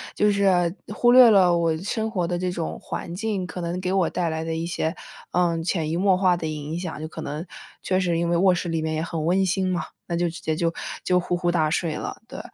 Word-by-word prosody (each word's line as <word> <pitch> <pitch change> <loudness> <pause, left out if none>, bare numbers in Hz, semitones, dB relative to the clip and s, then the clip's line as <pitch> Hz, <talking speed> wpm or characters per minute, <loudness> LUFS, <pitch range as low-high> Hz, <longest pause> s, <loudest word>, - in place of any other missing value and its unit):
就 210 0 +3
是 185 -4 +2 0.2
忽 240 +2 +4
略 250 -1 +9
了 185 -5 +5
我 165 -1 +1
生 220 +4 -2
活 180 -5 -1
的 175 +1 -2
这 180 0 -1
种 170 -2 -4
环 170 - -5
境， 205 -2 -2
可 180 - -7
能 175 +1 -3
给 185 - -1
我 190 -3 +2
带 175 -2 -1
来 160 0 -3
的 165 - -2
一 165 +1 -2
些， 170 0 -2 0.4
嗯， 170 -2 +1
潜 165 -2 -1
移 165 - -1
默 190 0 +3
化 185 -2 +3
的 160 - -4
影 155 +2 -4
响， 170 -4 -5
就 155 - -4
可 160 - -8
能 150 +4 -5 0.4
确 185 0 +1
实 175 -3 +1
因 170 0 0
为 170 - +2
卧 185 0 +4
室 175 0 -3
里 165 -1 -1
面 155 0 -2
也 155 - -1
很 165 -2 -3
温 190 +3 +3
馨 185 +1 0
嘛， 175 -3 -1 0.2
那 170 - -2
就 175 0 +1
直 170 - -9
接 155 - -1
就 165 0 0 0.3
就 180 0 +3
呼 180 0 -1
呼 175 0 0
大 160 -3 +2
睡 165 -2 -1
了， - - -6
对。 - - -7
175 Hz, 280 characters per minute, -24 LUFS, 165-185 Hz, 0.4 s, 略